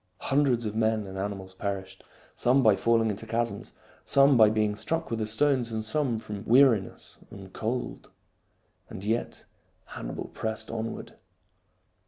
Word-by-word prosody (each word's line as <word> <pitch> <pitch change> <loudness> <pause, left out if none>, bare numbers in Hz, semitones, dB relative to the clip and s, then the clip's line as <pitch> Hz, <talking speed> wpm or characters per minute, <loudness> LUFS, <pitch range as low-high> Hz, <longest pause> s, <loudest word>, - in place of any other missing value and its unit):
Hundreds 135 -4 +3
of 105 0 -3
men 110 -1 +1
and 95 0 -8
animals 95 -1 -5
perished, 95 -1 -5 0.3
some 130 +2 +3
by 110 -3 +6
falling 115 +2 +2
into 105 +3 -7
chasms, 115 -2 -2 0.3
some 140 0 +5
by 110 -3 +7
being 105 -1 +1
struck 165 +8 -2
with 115 - -1
the 110 - -1
stones, 125 +1 +2
and 110 -1 -3
some 130 -1 0
from 105 -2 -7
weariness 120 -5 +3
and 95 -1 -11
cold. 120 +3 -4 0.8
And 95 - -8
yet 110 +3 -2 0.4
Hannibal - - -6
pressed 110 0 -4
onward. 115 0 -5
110 Hz, 145 wpm, -28 LUFS, 105-120 Hz, 0.8 s, by